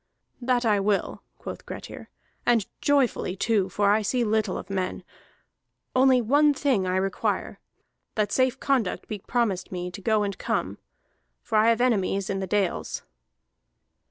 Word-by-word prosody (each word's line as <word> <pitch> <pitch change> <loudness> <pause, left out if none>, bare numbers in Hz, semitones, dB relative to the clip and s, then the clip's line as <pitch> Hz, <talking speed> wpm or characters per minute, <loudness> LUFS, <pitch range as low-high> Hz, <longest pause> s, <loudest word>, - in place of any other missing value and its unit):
"That 245 0 +1
I 210 -2 +3
will," 200 0 0 0.2
quoth - - -8
Grettir, - - -9 0.3
"and 235 -4 +3 0.2
joyfully 270 -9 +1
too, 205 -1 +1
for 205 -1 +2
I 215 +1 +3
see 240 +4 0
little 220 -1 0
of - - -7
men. 185 -1 -2 0.9
Only 260 0 +5
one 290 +5 +4
thing 255 -10 +1
I 185 - 0
require, 190 +1 -1 0.6
that 210 -2 0
safe 255 0 +2
conduct 255 -9 0
be 210 - -5
promised 220 -3 -1
me 180 -1 -4
to 200 - -9
go 215 +1 +2
and 200 -1 -2
come, - - -2 0.6
for 225 - -3
I 215 +2 +5
have 230 +1 +2
enemies 200 -5 +1
in 195 - -2
thy 190 - -3
dales." 195 -2 -1
215 Hz, 155 wpm, -26 LUFS, 195-245 Hz, 0.9 s, Only